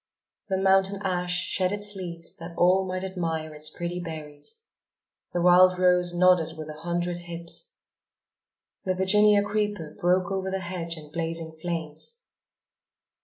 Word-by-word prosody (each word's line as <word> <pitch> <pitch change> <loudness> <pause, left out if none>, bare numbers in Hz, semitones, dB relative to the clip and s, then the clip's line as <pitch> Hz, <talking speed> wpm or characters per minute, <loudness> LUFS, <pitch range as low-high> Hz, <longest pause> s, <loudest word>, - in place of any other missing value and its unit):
The 190 - +1
mountain 195 +1 +3
ash 180 -2 -1
shed 185 0 0
its 205 0 -3
leaves 170 -3 -7
that 170 0 -9
all 185 +2 +4
might 185 0 -3
admire 165 -4 -3
its 150 0 0
pretty 175 +1 -4
berries; 160 - -8 0.7
the 175 - -1
wild 180 +1 +6
rose 180 -1 +3
nodded 175 -2 +3
with 155 -1 -7
a 150 0 -8
hundred 175 0 -2
hips; 170 - -5 1.1
the 185 -2 0
Virginia 205 +2 +5
creeper 205 -6 -2
broke 180 -1 +1
over 190 0 -1
the 190 0 -2
hedge 170 -2 -4
in 150 -1 -12
blazing 165 -1 -3
flames. 170 - -4
180 Hz, 140 wpm, -26 LUFS, 165-190 Hz, 1.1 s, wild